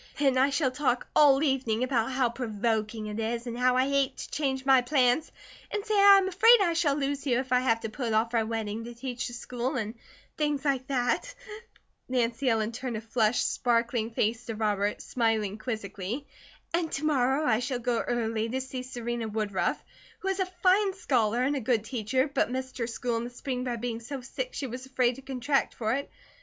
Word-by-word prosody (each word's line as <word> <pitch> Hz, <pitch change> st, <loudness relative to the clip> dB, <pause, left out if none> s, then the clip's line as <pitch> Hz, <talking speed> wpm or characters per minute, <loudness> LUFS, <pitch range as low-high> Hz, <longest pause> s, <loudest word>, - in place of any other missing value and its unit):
Then 275 Hz, -3 st, +3 dB
I 265 Hz, +2 st, +4 dB
shall 275 Hz, -2 st, +1 dB
talk 255 Hz, -2 st, 0 dB
all 285 Hz, -1 st, +6 dB
evening 255 Hz, -5 st, +1 dB
about 250 Hz, -2 st, 0 dB
how 255 Hz, -1 st, +2 dB
provoking 220 Hz, -2 st, -2 dB
it 210 Hz, +1 st, -5 dB
is, 230 Hz, +2 st, -2 dB
and 235 Hz, -1 st, -4 dB
how 250 Hz, +1 st, +2 dB
I 260 Hz, +1 st, +3 dB
hate 275 Hz, -1 st, +1 dB
to -, -, -7 dB
change 265 Hz, -3 st, -1 dB
my 265 Hz, -2 st, +6 dB
plans, 255 Hz, +2 st, +2 dB, 0.4 s
and 415 Hz, 0 st, -3 dB
say 435 Hz, -, -1 dB
I 400 Hz, -1 st, +8 dB
am 385 Hz, -1 st, +2 dB
afraid 450 Hz, +6 st, +6 dB
I 350 Hz, -4 st, +2 dB
shall 320 Hz, -4 st, +2 dB
lose 280 Hz, 0 st, -2 dB
you 245 Hz, -2 st, +3 dB
if 260 Hz, 0 st, -3 dB
I 250 Hz, -, +5 dB
have 230 Hz, -3 st, +1 dB
to 225 Hz, -, -4 dB
put 235 Hz, 0 st, -3 dB
off 225 Hz, +2 st, +1 dB
our 230 Hz, -1 st, +3 dB
wedding 220 Hz, 0 st, -3 dB
to 240 Hz, 0 st, -8 dB
teach 250 Hz, 0 st, -4 dB
the 240 Hz, -, -8 dB
school, 245 Hz, +1 st, -3 dB
and 220 Hz, -3 st, -2 dB, 0.5 s
things 295 Hz, -2 st, 0 dB
like 265 Hz, -2 st, 0 dB
that," 265 Hz, -, 0 dB, 0.7 s
Nancy 245 Hz, +1 st, +1 dB
Ellen 220 Hz, -1 st, +1 dB
turned 245 Hz, -1 st, -4 dB
a -, -, -5 dB
flushed 225 Hz, 0 st, +1 dB
sparkling 235 Hz, -2 st, +1 dB
face 225 Hz, +1 st, -1 dB
to 225 Hz, -, -3 dB
Robert, 210 Hz, -1 st, -1 dB
smiling 220 Hz, -4 st, 0 dB
quizzically, 215 Hz, +2 st, -4 dB, 0.5 s
"and 335 Hz, -1 st, 0 dB
to 305 Hz, -, -2 dB
morrow 275 Hz, 0 st, +2 dB
I 220 Hz, -4 st, +3 dB
shall 250 Hz, +1 st, -2 dB
go 245 Hz, -1 st, 0 dB
early 225 Hz, -2 st, -1 dB
to 260 Hz, +3 st, -1 dB
see 260 Hz, -1 st, -5 dB
Serena 240 Hz, -2 st, -4 dB
Woodruff, 210 Hz, -3 st, -1 dB, 0.4 s
who 385 Hz, -, -1 dB
is 385 Hz, 0 st, -1 dB
a 380 Hz, -, +1 dB, 0.2 s
fine 385 Hz, +1 st, +4 dB
scholar 245 Hz, -, +1 dB
and 280 Hz, +3 st, +1 dB
a -, -, 0 dB
good 230 Hz, -2 st, +1 dB
teacher, 255 Hz, +3 st, 0 dB
but 275 Hz, -4 st, 0 dB
missed 260 Hz, 0 st, -5 dB
her 230 Hz, -, -1 dB
school 235 Hz, 0 st, -2 dB
in 230 Hz, -, -2 dB
the -, -, -5 dB
spring 250 Hz, 0 st, -4 dB
by 245 Hz, -1 st, -1 dB
being 235 Hz, 0 st, -3 dB
so 265 Hz, +3 st, -6 dB
sick -, -, -5 dB
she 285 Hz, -, -3 dB
was 255 Hz, +1 st, -7 dB
afraid 255 Hz, -2 st, +2 dB
to -, -, -10 dB
contract 270 Hz, +1 st, -1 dB
for 220 Hz, -1 st, -1 dB
it. 280 Hz, +2 st, -3 dB
250 Hz, 210 wpm, -28 LUFS, 230-275 Hz, 0.7 s, I